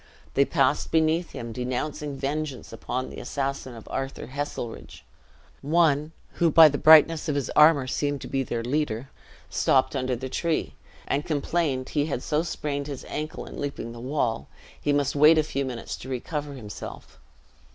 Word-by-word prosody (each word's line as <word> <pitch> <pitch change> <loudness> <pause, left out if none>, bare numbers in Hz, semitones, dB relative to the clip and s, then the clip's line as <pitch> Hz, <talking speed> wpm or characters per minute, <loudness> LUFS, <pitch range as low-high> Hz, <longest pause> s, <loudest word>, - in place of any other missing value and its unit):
They 140 - +4
passed 140 -2 +1
beneath 160 +2 +2
him, 115 -1 -6
denouncing 135 +4 -3
vengeance 145 -1 -4
upon 130 +1 -4
the - - -8
assassin 135 -3 -3
of 115 - -12
Arthur 135 0 -4
Heselrigge! 130 -3 -6 0.6
One, 150 0 +2 0.3
who 170 - +4
by 160 0 +9
the 145 - -3
brightness 160 0 +6
of 145 - 0
his 140 -3 -2
armor 150 -3 +6
seemed 145 +2 -1
to - - -6
be 135 - -1
their 120 -3 -3
leader, 130 -2 -2 0.4
stopped 130 +1 +2
under 130 -1 0
the 130 +2 -5
tree, 165 +5 -1 0.3
and 145 - 0
complained 150 -3 -1
he 145 -1 0
had 140 -5 -3
so 150 0 +1
sprained 145 -4 -3
his 140 -3 -6
ankle 155 +1 -4
in - - -8
leaping 140 -5 -4
the 120 - -9
wall, 120 - -1 0.3
he 145 - +1
must 145 -1 +1
wait 150 +3 +7
a 155 - +4
few 140 -2 -2
minutes 125 -3 -5
to 130 - -10
recover 145 +3 -4
himself. 105 -6 -9
140 Hz, 170 wpm, -26 LUFS, 130-150 Hz, 0.6 s, by